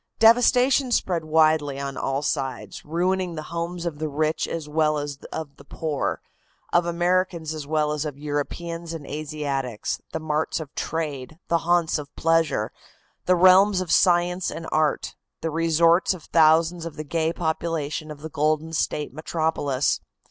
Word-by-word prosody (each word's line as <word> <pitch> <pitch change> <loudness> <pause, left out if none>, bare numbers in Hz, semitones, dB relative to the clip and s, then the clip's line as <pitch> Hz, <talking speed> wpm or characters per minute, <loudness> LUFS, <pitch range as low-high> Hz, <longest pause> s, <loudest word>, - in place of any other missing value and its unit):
Devastation 245 +3 +5
spread 175 -7 +1
widely 155 -3 +3
on 140 -1 -4
all 135 +2 -2
sides, 135 -2 -3
ruining 180 +2 -1
the 155 - -5
homes 170 +1 -3
of 155 -4 -4
the 155 -1 -2
rich 155 +2 0
as 160 -2 -4
well 155 0 +1
as 145 -1 -4
of 150 -3 -6
the - - -14
poor, 150 0 -3 0.5
of 175 0 +3
Americans 175 -2 0
as 150 -2 -6
well 150 -1 +1
as 150 -1 -1
of 150 -3 -5
Europeans 165 +3 -4
and 150 -3 -8
Asiatics, 145 -6 -3
the 160 - -3
marts 155 0 -1
of 150 -3 -8
trade, 155 -2 -4
the 170 - +3
haunts 175 -3 +3
of 145 -1 -10
pleasure, 165 -3 +1 0.6
the 180 - +5
realms 185 +2 +6
of 185 -3 -3
science 180 0 +3
and 165 +1 -6
art, 155 -2 0 0.3
the 165 - -2
resorts 165 +3 +3
of 170 - -12
thousands 165 +1 +3
of 165 -2 -6
the 155 - -5
gay 160 +2 0
population 160 -2 -2
of 150 -1 -9
the 160 - -6
Golden 155 +2 0
State 150 -3 -1
metropolis. 155 -3 0
160 Hz, 160 wpm, -24 LUFS, 150-170 Hz, 0.6 s, realms